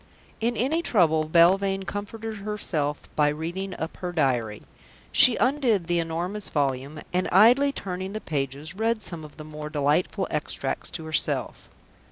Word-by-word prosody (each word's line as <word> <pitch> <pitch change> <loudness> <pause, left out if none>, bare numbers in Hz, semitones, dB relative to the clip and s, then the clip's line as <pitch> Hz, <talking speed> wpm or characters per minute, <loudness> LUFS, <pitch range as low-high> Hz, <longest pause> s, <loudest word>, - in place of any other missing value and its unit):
In 235 +1 0
any 295 +8 +1
trouble 160 - +3
Belvane 190 +4 +4
comforted 215 +3 -5
herself 180 -8 -2
by 150 -1 +4
reading 175 +5 -4
up 160 - -5
her 180 -1 -4
diary. 125 -10 0 0.5
She 250 - +6
undid 250 - +2
the 175 0 +1
enormous 175 +5 -2
volume, 140 +1 -1
and, 180 +1 +1
idly 245 +9 +6
turning 190 -5 -5
the 215 - -3
pages, 145 -1 -4
read 220 +2 0
some 170 -3 -4
of 150 - -12
the 155 - -9
more 150 0 -7
delightful 150 +6 0
extracts 150 - -2
to 165 -2 -6
herself. 160 0 -1
175 Hz, 150 wpm, -25 LUFS, 155-210 Hz, 0.5 s, She